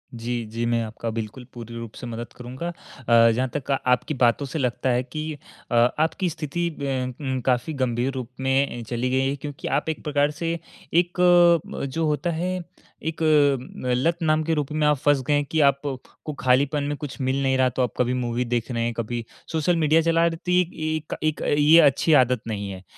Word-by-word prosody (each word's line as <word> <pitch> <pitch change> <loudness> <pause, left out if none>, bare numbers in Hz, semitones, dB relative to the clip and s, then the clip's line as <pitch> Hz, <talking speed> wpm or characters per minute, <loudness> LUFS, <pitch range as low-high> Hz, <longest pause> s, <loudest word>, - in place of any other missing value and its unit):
जी, 120 0 -3
जी, 115 +1 -2
मैं 115 0 +1
आपका 115 +1 -5
बिल्कुल 115 +3 -5
पूरी 115 -1 -9
रूप 115 -2 -7
से 125 - -7
मदद 120 +1 -6
करूँगा। 125 +7 -6
अ, 115 -8 +2
जहाँ 130 +3 0
तक 140 -1 -3
आपकी 125 +5 +1
बातों 120 +4 +3
से 145 +4 -4
लगता 125 0 0
है 125 0 +2
कि 155 +3 -5 0.4
अ, - - +1 0.2
आपकी 165 +3 +1
स्थिति 165 +2 -3
अ, 145 -3 -9 0.4
उम, 130 -2 -2
काफ़ी 125 +4 +1
गंभीर 120 +2 0
रूप 130 -3 -5
में 135 +1 +2
ए, 120 - -7
चली 125 +1 -1
गई 130 +1 +1
है। 140 - -1
क्योंकि 145 0 -7
आप - - 0
एक 160 - -4
प्रकार 145 0 +1
से 165 0 0 0.4
एक 175 +1 +1 0.6
अ, - - -1
जो 160 +4 -2
होता 150 +3 0
है, 180 +3 -2 0.5
एक 160 0 -4
अ, 145 -3 +4 0.4
लत 165 +6 +1
नाम 155 -1 +2
के 165 - 0
रूप 150 -2 -2
में 155 0 +1
आप 150 -1 +3
फँस 145 0 +2
गए 150 - +3
हैं 145 0 +2
कि 160 - +1
आपको 140 +2 -6
खालीपन 140 +3 +2
में 145 +1 -2
कुछ 145 -3 -7
मिल 130 +1 0
नहीं 130 0 +2
रहा, 130 -1 +3
तो 130 +1 -2
आप 125 - 0
कभी 125 0 +1
मूवी 125 -1 -1
देख 120 -1 -2
रहे 115 -1 -1
हैं, 120 0 -1
कभी 115 +1 -3 0.3
सोशल 160 +2 +1
मीडिया 160 0 +3
चला 165 +1 +3
रहे। 165 -1 +1
तो 180 +2 -4
एक 180 -1 +4
एक 155 -1 -3
एक 155 -1 0
अ, - - -2
ये 150 +3 +6
अच्छी 145 +2 +4
आदत 125 -2 -1
नहीं 100 -2 -3
है। 95 0 -9
135 Hz, 215 wpm, -24 LUFS, 120-155 Hz, 0.6 s, ये